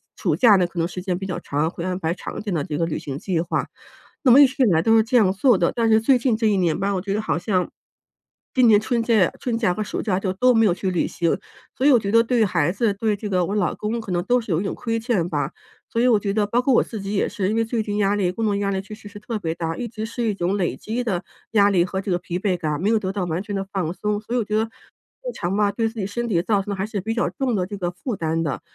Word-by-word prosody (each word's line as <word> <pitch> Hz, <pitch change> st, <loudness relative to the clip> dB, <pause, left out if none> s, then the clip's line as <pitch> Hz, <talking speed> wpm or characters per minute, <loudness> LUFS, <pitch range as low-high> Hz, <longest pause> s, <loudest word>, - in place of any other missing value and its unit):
暑 -, -, 0 dB
假 225 Hz, -5 st, +6 dB
呢， 180 Hz, -2 st, +3 dB
可 175 Hz, -1 st, -7 dB
能 165 Hz, -, +1 dB
时 180 Hz, +1 st, -7 dB
间 180 Hz, -2 st, -2 dB
比 190 Hz, -, -5 dB
较 185 Hz, -, -3 dB
长， 150 Hz, +3 st, -1 dB
会 170 Hz, -, -7 dB
安 185 Hz, 0 st, -2 dB
排 165 Hz, -1 st, -1 dB
长 -, -, -7 dB
一 -, -, -5 dB
点 205 Hz, -, -3 dB
的 150 Hz, -4 st, 0 dB
这 150 Hz, -, -4 dB
个 165 Hz, -, +1 dB
旅 160 Hz, -, -3 dB
行 140 Hz, -1 st, -6 dB
计 180 Hz, -5 st, -1 dB
划。 175 Hz, -, -2 dB, 0.6 s
那 255 Hz, -, +6 dB
么 280 Hz, +4 st, +9 dB
一 280 Hz, -, +8 dB
直 265 Hz, 0 st, 0 dB
以 -, -, +5 dB
来 165 Hz, -4 st, +3 dB
都 225 Hz, +5 st, +4 dB
是 220 Hz, -, +5 dB
这 235 Hz, +3 st, -2 dB
样 195 Hz, -5 st, +4 dB
做 220 Hz, +1 st, +4 dB
的， 170 Hz, -, +2 dB
但 230 Hz, -1 st, +2 dB
是 220 Hz, 0 st, +5 dB
最 255 Hz, +2 st, +4 dB
近 240 Hz, -2 st, +1 dB
这 225 Hz, -1 st, +1 dB
1 205 Hz, -2 st, +2 dB
年 170 Hz, -4 st, +1 dB
吧， 200 Hz, +1 st, 0 dB
我 180 Hz, -, -1 dB
觉 200 Hz, 0 st, -3 dB
得 215 Hz, -, 0 dB
好 165 Hz, -, -1 dB
像 180 Hz, 0 st, 0 dB, 0.9 s
今 250 Hz, -2 st, +5 dB
年 210 Hz, -2 st, +6 dB
春 235 Hz, 0 st, 0 dB
假 220 Hz, -6 st, +3 dB
春 240 Hz, -3 st, -2 dB
假 185 Hz, -6 st, +2 dB
和 215 Hz, -, -2 dB
暑 210 Hz, -, -4 dB
假 190 Hz, -3 st, 0 dB
就 190 Hz, -2 st, -2 dB
都 250 Hz, +5 st, +3 dB
没 225 Hz, -1 st, +5 dB
有 180 Hz, -, +3 dB
去 190 Hz, +1 st, -2 dB
旅 175 Hz, -, 0 dB
行， 170 Hz, 0 st, 0 dB, 0.4 s
所 260 Hz, -, 0 dB
以 -, -, +7 dB
我 245 Hz, -, +6 dB
觉 200 Hz, -1 st, -3 dB
得 230 Hz, 0 st, +5 dB
对 235 Hz, -1 st, +2 dB
孩 170 Hz, -3 st, +1 dB
子、 205 Hz, +1 st, 0 dB
对 215 Hz, 0 st, 0 dB
这 205 Hz, 0 st, -6 dB
个 180 Hz, -2 st, +1 dB
我 200 Hz, -, -3 dB
老 180 Hz, -6 st, 0 dB
公 225 Hz, +2 st, -3 dB
可 205 Hz, -4 st, -7 dB
能 175 Hz, 0 st, 0 dB
都 245 Hz, +3 st, +2 dB
是 220 Hz, -, -6 dB
有 160 Hz, -, +2 dB
一 -, -, -3 dB
种 -, -, -2 dB
亏 230 Hz, -1 st, -2 dB
欠 215 Hz, -8 st, 0 dB
吧， -, -, -2 dB, 0.4 s
所 230 Hz, -, 0 dB
以 250 Hz, -, +4 dB
我 220 Hz, -4 st, +4 dB
觉 200 Hz, -1 st, -2 dB
得 205 Hz, -1 st, +1 dB
包 240 Hz, +4 st, +1 dB
括 270 Hz, -, +3 dB
我 -, -, +5 dB
自 220 Hz, -, -7 dB
己 195 Hz, +1 st, -4 dB
也 195 Hz, -, +1 dB
是， 190 Hz, -1 st, -2 dB
因 220 Hz, -, 0 dB
为 225 Hz, -, +2 dB
最 225 Hz, -1 st, -1 dB
近 205 Hz, 0 st, -3 dB
压 205 Hz, 0 st, +2 dB
力 185 Hz, -3 st, +1 dB
工 225 Hz, +4 st, -4 dB
作 205 Hz, -1 st, +1 dB
压 200 Hz, 0 st, -1 dB
力 190 Hz, 0 st, -1 dB
确 210 Hz, +2 st, -10 dB
实 210 Hz, -1 st, -13 dB
是 205 Hz, 0 st, -11 dB
特 220 Hz, +1 st, -4 dB
别 160 Hz, -3 st, -2 dB
大， 165 Hz, -1 st, -3 dB
一 240 Hz, -, -3 dB
直 220 Hz, 0 st, -6 dB
是 235 Hz, +1 st, -4 dB
一 215 Hz, -2 st, +1 dB
种 190 Hz, +2 st, -1 dB
累 175 Hz, -3 st, -1 dB
积 235 Hz, +3 st, -3 dB
的 190 Hz, -6 st, -2 dB, 0.3 s
压 205 Hz, -2 st, +5 dB
力 180 Hz, -3 st, +3 dB
和 190 Hz, +1 st, -3 dB
这 195 Hz, -, -4 dB
个 175 Hz, -, +2 dB
疲 180 Hz, 0 st, -4 dB
惫 185 Hz, -3 st, 0 dB
感， 155 Hz, -2 st, -2 dB
没 205 Hz, -, +1 dB
有 225 Hz, -, +3 dB
得 190 Hz, -2 st, -3 dB
到 195 Hz, -3 st, -2 dB
完 175 Hz, +3 st, -2 dB
全 205 Hz, -1 st, -5 dB
地 195 Hz, -, -1 dB
放 180 Hz, -4 st, -2 dB
松。 210 Hz, +1 st, -2 dB
所 235 Hz, +3 st, -4 dB
以 -, -, +2 dB
我 -, -, 0 dB
觉 215 Hz, -, -2 dB
得 220 Hz, -, +2 dB
日 375 Hz, -, -12 dB
常 180 Hz, +3 st, -2 dB
吧， 205 Hz, -1 st, +2 dB
对 225 Hz, 0 st, 0 dB
自 225 Hz, -1 st, -9 dB
己 195 Hz, -, -2 dB
身 240 Hz, +3 st, -3 dB
体 170 Hz, -6 st, +1 dB
造 200 Hz, +1 st, +1 dB
成 205 Hz, -, -5 dB
的 -, -, -1 dB
还 190 Hz, +1 st, -2 dB
是 205 Hz, -4 st, -3 dB
比 225 Hz, +3 st, -2 dB
较 240 Hz, -, 0 dB
重 255 Hz, -5 st, -1 dB
的 180 Hz, -2 st, 0 dB
这 205 Hz, -1 st, -6 dB
个 175 Hz, -2 st, -2 dB
负 205 Hz, +6 st, -5 dB
担 165 Hz, -1 st, -1 dB
的， 145 Hz, -, -3 dB
205 Hz, 350 characters per minute, -22 LUFS, 180-225 Hz, 0.9 s, 么